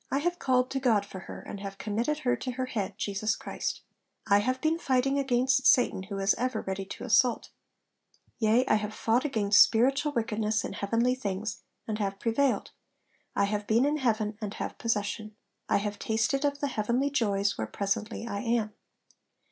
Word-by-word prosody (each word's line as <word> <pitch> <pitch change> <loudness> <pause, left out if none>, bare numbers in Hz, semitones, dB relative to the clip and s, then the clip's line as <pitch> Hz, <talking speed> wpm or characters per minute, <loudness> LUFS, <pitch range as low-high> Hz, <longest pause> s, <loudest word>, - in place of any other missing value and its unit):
I 275 - 0
have 350 +4 -1
called 255 -1 +2
to 270 - -1
God 225 -6 +2
for 190 - -9
her, 180 - -9
and 200 - -8
have 195 0 -7
committed 235 +10 -1
her 245 - +3
to 255 - -4
her 260 +1 -2
head, 220 -6 -4
Jesus 210 +2 -1
Christ. - - -4 0.4
I 200 -1 +5
have 255 +5 0
been 315 +3 +1
fighting 270 -1 +1
against 265 0 +2
Satan, 245 -6 +4
who 195 +1 -6
is 195 +1 +3
ever 255 +1 -1
ready 190 0 -4
to 195 - -8
assault. 245 0 +2 0.9
Yea, 225 +3 +3
I 215 - +3
have 210 0 -4
fought 235 +5 +1
against 210 -7 +4
spiritual 270 +6 +4
wickedness 220 -2 0
in - - -5
heavenly 230 +5 +1
things, 210 -4 -4 0.3
and 215 -1 -3
have 195 -1 -2
prevailed. 245 +5 +1 0.6
I 200 - +2
have 205 0 -1
been 230 +4 +3
in 295 +1 +1
heaven 220 -5 0
and 210 -1 -4
have - - -5
possession. 215 -1 -2 0.3
I - - +4
have 205 0 -3
tasted 250 +6 0
of 285 0 -1
the 285 - +1
heavenly 245 +5 0
joys 205 -6 +1
where 110 - -3
presently 210 - -2
I 200 -3 -3
am.' 230 -2 0
225 Hz, 185 wpm, -28 LUFS, 205-255 Hz, 0.9 s, I